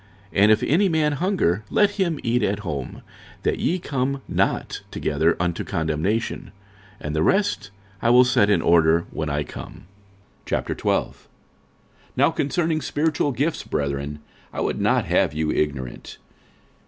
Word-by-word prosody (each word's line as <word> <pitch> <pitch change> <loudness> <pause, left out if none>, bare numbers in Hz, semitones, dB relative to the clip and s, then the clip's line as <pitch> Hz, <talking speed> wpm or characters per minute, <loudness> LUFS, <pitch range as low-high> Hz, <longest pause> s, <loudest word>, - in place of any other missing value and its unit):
46:011:034 100 - +2
And 105 +2 +7
if 110 - +3
any 190 +6 +3
man 155 -2 +2
hunger, 145 - 0
let 205 -1 +4
him 180 -7 -1
eat 120 +1 +1
at 100 -1 0
home; 75 -9 -5 0.4
that - - 0
ye 180 - +1
come 140 -4 -2
not - - -1
together 80 +3 0
unto 85 -1 -1
condemnation. 80 +8 -2 0.5
And 75 0 -4
the 75 - +1
rest 195 - +1 0.3
will 120 +1 +6
I - - +7
set 125 -5 +3
in 105 - +3
order 85 0 +4
when 80 -1 -3
I 75 +1 -1
come. - - -10 0.6
46:012:001 - - -1 1.0
Now - - +4
concerning 160 +2 0
spiritual 150 -1 0
gifts, 145 +5 -1
brethren, 70 +1 -3 0.3
I - - -6
would - - -1
not - - +2
have 75 - +1
you 80 0 0
ignorant. 70 -5 -3
105 Hz, 145 wpm, -23 LUFS, -, 1.0 s, And